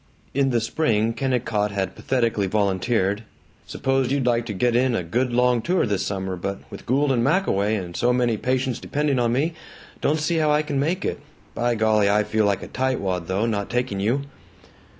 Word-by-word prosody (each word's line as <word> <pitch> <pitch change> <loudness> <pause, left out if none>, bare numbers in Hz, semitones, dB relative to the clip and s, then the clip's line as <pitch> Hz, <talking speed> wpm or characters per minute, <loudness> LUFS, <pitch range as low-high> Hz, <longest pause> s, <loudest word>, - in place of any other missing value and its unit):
In 135 0 +2
the 120 -2 +2
spring 115 -2 +1
Kennicott 120 -5 0
had 100 -2 -2
pathetically 115 -6 0
volunteered, 100 +1 +1 0.5
"S'pose 135 -1 0
you'd 140 -2 +1
like 120 -1 +1
to 105 - -3
get 120 +5 +1
in 125 0 +2
a 90 - -1
good 120 +9 -1
long 125 0 +3
tour 180 +8 +1
this 100 -3 -1
summer, 95 -1 -3
but 100 +3 -4
with - - -10
Gould 140 +3 +2
and 120 -3 +2
Mac 185 +9 +2
away 100 +3 +1
and 90 -4 -5
so 120 - +2
many 125 -2 +2
patients 130 +2 -1
depending 145 -3 0
on 120 -1 +2
me, 145 +7 0 0.5
don't 150 - +2
see 165 +2 0
how 155 -1 +2
I 150 +1 +3
can 140 -2 -2
make 170 +7 0
it. - - -2 0.3
By 120 +1 0
golly, 110 -2 +3
I 105 +1 +3
feel 110 0 +1
like 100 -2 0
a - - -7
tightwad 100 -10 -1
though, 95 +4 0
not 105 -3 -2
taking 120 -5 -1
you." 120 +8 0
120 Hz, 200 wpm, -23 LUFS, 100-130 Hz, 0.5 s, long